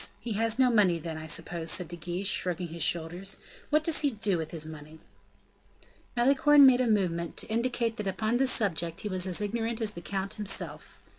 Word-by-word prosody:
he 235 - -4
has 225 +2 +1
no 255 -2 +4
money 200 -7 +4
then, 165 0 -6
I 155 0 -7
suppose," 165 +1 -3
said 180 - +1
De 175 - -6
Guiche, 175 +3 -5
shrugging 180 -3 0
his 165 +1 -7
shoulders. 175 +5 -1 0.3
"What 305 +1 +2
does 325 -1 +2
he 290 - +2
do 210 -5 0
with 160 - -4
his 160 -2 -4
money?" 155 0 -10 1.2
Malicorne 280 +3 +6
made 255 -1 +6
a 250 - +1
movement, 175 -6 0
to - - -3
indicate 235 0 -1
that 210 - -4
upon 215 +5 0
this 265 0 +3
subject 170 -8 0
he 210 - -4
was 185 -1 -1
as 185 +2 +1
ignorant 225 +2 -2
as 220 -3 -1
the 170 - -9
count 195 +1 -4
himself. 210 -2 -3
200 Hz, 205 wpm, -29 LUFS, 170-230 Hz, 1.2 s, Malicorne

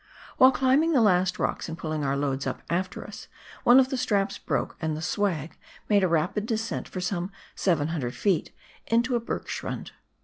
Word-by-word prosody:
While 260 0 +8
climbing 270 +6 +3
the 270 - +5
last 185 -3 +3
rocks - - -2
and 165 - -5
pulling 155 -3 -3
our 140 0 0
loads 140 -1 -1
up - - -4
after 185 +1 -2
us, - - -10 0.4
one 245 +2 +7
of 260 -1 +3
the 265 - -2
straps 200 -4 0
broke, - - -2
and 160 -2 -1
the - - -5
"swag" 165 -5 -1 0.3
made 205 -2 +4
a - - +4
rapid 180 +6 0
descent 225 0 -2
for 185 - -6
some 180 0 -2 0.2
700 155 -7 0
ft. 185 +2 0 0.4
into 240 +2 +2
a 235 - +1
hergschrund. 230 - -5
185 Hz, 180 wpm, -26 LUFS, 160-230 Hz, 0.4 s, While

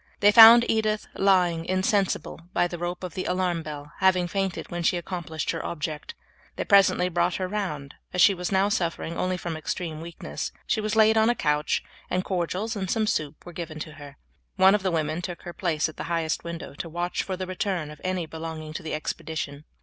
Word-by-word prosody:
They 205 0 +6
found 230 +2 +10
Edith 215 -1 +1
lying 180 -4 +3
insensible 185 0 0
by 175 - +2
the 175 -1 -7
rope 175 +1 -4
of 180 -4 -5
the 185 - -4
alarm 180 -2 0
bell, 150 -2 -8
having 185 -2 +3
fainted 195 0 -3
when 175 0 -3
she 170 - +2
had 175 - -4
accomplished 165 -4 -3
her 165 - -4
object. 155 -2 -5 0.4
They - - -2
presently 195 -3 +5
brought 175 0 +1
her 185 - -2
round; 165 -9 -4 0.2
as 180 - -3
she 200 - +7
was 180 0 -4
now 195 +1 +3
suffering 170 -3 -2
only 185 +1 -1
from 170 -2 -4
extreme 155 0 -4
weakness, 75 - -6
she 215 - 0
was 215 +1 -1
laid 220 0 +5
on 220 +1 +4
a 240 - +2
couch, 150 -4 0 0.3
and 180 0 0
cordials 190 +5 -2
and 190 -3 -3
some 220 +2 +1
soup 155 -7 -2
were 175 - -9
given 165 -2 -6
to 155 - -6
her. 145 -2 -12 0.4
One 190 0 +6
of 210 - +2
the 190 - 0
women 160 0 -1
took 175 -1 -6
her 175 - -7
place 165 -5 0
at 155 - -11
the - - -5
highest 165 -2 -1
window 170 -3 -6
to 165 +3 -6
watch 175 +2 -2
for 190 -1 -4
the 185 - -3
return 185 -4 -2
of 150 - -13
any 185 -2 -1
belonging 160 -1 -7
to - - -5
the 155 - -3
expedition. 155 -1 -5
175 Hz, 215 wpm, -26 LUFS, 160-190 Hz, 0.4 s, found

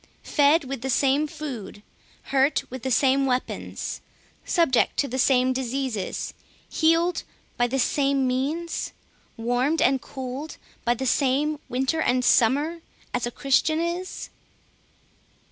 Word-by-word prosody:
Fed 295 +2 +3
with 270 -2 -5
the 265 - -3
same 275 +3 +2
food, 245 -9 -7 0.5
hurt 275 +2 +3
with 260 -1 -6
the 265 - -2
same 270 +2 +3
weapons, 250 0 -3 0.4
subject 330 -9 +2
to 285 - +1
the 260 +1 -3
same 255 0 +3
diseases, 255 -5 -3 0.3
healed 330 +2 +2 0.3
by 245 - +2
the 265 +3 -1
same 275 +1 +2
means, 285 +7 -2 0.4
warmed 245 +7 +1
and 265 0 +3
cooled 265 +3 -6 0.3
by 240 0 +3
the 265 - -4
same 285 +3 +1
winter 265 +6 0
and 250 -3 +1
summer, 290 +8 +3 0.3
as 245 -1 0
a - - -4
Christian 290 +5 +2
is? 345 +2 -4
270 Hz, 130 wpm, -25 LUFS, 250-300 Hz, 0.5 s, Fed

